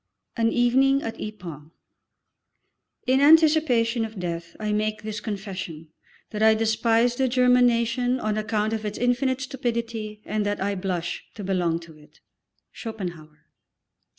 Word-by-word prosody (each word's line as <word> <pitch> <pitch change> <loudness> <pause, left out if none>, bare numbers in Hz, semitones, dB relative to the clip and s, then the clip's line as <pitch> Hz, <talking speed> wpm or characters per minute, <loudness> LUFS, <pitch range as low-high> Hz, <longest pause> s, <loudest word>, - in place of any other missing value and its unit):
_" - - -57 0.3
X 230 -1 +2
AN - - +1
EVENING 265 +3 +3
AT 225 0 -5
YPRES 170 -8 -8 1.4
"In 260 +2 +3
anticipation 290 -7 +4
of 220 -2 -6
death 170 -1 -5
I 210 -1 -1
make 215 0 -1
this 215 0 -4
confession, 190 -7 -6 0.4
that 215 - -4
I 220 0 +6
despise 225 +2 +2
the 265 - +2
German 250 0 +4
nation 245 +2 +1
on 215 -2 -1
account 215 0 -1
of 220 -1 -3
its 210 0 -4
infinite 255 +2 +1
stupidity, 230 -5 -4
and 215 0 -1
that 205 0 -1
I 200 +1 -1
blush 185 -3 -3
to 210 - -7
belong 180 -3 0
to 165 -2 -14
it." 150 - -21 0.5
SCHOPENHAUER. 175 -9 -7
220 Hz, 150 wpm, -25 LUFS, 195-245 Hz, 1.4 s, I